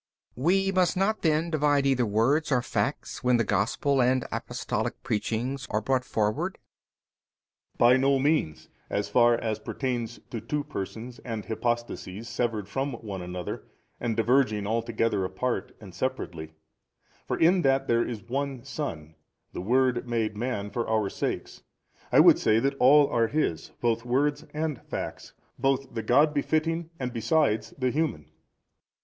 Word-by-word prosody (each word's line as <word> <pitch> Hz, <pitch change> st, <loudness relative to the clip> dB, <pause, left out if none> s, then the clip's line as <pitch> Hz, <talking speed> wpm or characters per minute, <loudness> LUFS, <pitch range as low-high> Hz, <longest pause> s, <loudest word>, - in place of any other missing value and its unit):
B. 125 Hz, -, -9 dB
We 195 Hz, +5 st, +3 dB
must 185 Hz, -1 st, +2 dB
not 205 Hz, +3 st, +1 dB
then 160 Hz, +1 st, +1 dB
divide 145 Hz, -2 st, +2 dB
either 130 Hz, -4 st, +2 dB
words 130 Hz, +10 st, +2 dB
or 125 Hz, -3 st, +2 dB
facts, 135 Hz, +2 st, -2 dB
when 125 Hz, -1 st, +4 dB
the 115 Hz, -, +2 dB
Gospel 120 Hz, -, +1 dB
and 125 Hz, +1 st, +2 dB
Apostolic -, -, -3 dB
preachings 115 Hz, +3 st, -2 dB
are 105 Hz, -, +1 dB
brought 130 Hz, +4 st, 0 dB
forward? 105 Hz, -3 st, -1 dB
A. -, -, -48 dB
By 120 Hz, +2 st, +6 dB
no 135 Hz, +1 st, +3 dB
means, 140 Hz, -, 0 dB, 0.2 s
as 100 Hz, 0 st, -1 dB
far 120 Hz, +2 st, +5 dB
as 110 Hz, -2 st, -2 dB
pertains 120 Hz, -1 st, -3 dB
to 115 Hz, -, -4 dB
two 150 Hz, -1 st, -2 dB
persons 120 Hz, -2 st, -6 dB
and 115 Hz, -4 st, -5 dB
hypostases 120 Hz, -3 st, -3 dB
severed 115 Hz, -4 st, -2 dB
from 135 Hz, +5 st, -2 dB
one 105 Hz, -5 st, -6 dB
another 90 Hz, 0 st, -5 dB, 0.4 s
and 115 Hz, -2 st, -2 dB
diverging 115 Hz, -3 st, +2 dB
altogether 115 Hz, -2 st, 0 dB
apart 95 Hz, +3 st, -3 dB
and 100 Hz, -4 st, -12 dB
separately: 85 Hz, -8 st, -4 dB, 0.7 s
for -, -, -1 dB
in 175 Hz, +3 st, +4 dB
that 135 Hz, -1 st, +2 dB
there 115 Hz, 0 st, +3 dB
is 115 Hz, -4 st, -5 dB
One 135 Hz, 0 st, -3 dB
Son, 105 Hz, -, -5 dB, 0.4 s
the -, -, -4 dB
Word 125 Hz, +3 st, +1 dB
made 110 Hz, -3 st, 0 dB
Man 105 Hz, -3 st, -3 dB
for 120 Hz, -2 st, -2 dB
our 110 Hz, -3 st, +1 dB
sakes, -, -, -4 dB, 0.5 s
I -, -, +7 dB
would -, -, +7 dB
say 110 Hz, +1 st, +3 dB
that 135 Hz, +4 st, +1 dB
all 145 Hz, +3 st, +7 dB
are 115 Hz, -1 st, +2 dB
His, 100 Hz, -, -1 dB
both 115 Hz, -1 st, +1 dB
words 145 Hz, +5 st, 0 dB
and 150 Hz, -4 st, -3 dB
facts, -, -, -5 dB, 0.3 s
both 135 Hz, 0 st, 0 dB
the 115 Hz, -, -2 dB
God 145 Hz, +7 st, +4 dB
befitting 160 Hz, +3 st, 0 dB
and 125 Hz, -2 st, -3 dB
besides 115 Hz, -2 st, +1 dB
the 130 Hz, -2 st, 0 dB
human. 150 Hz, -, -1 dB
120 Hz, 155 wpm, -27 LUFS, 110-140 Hz, 0.7 s, I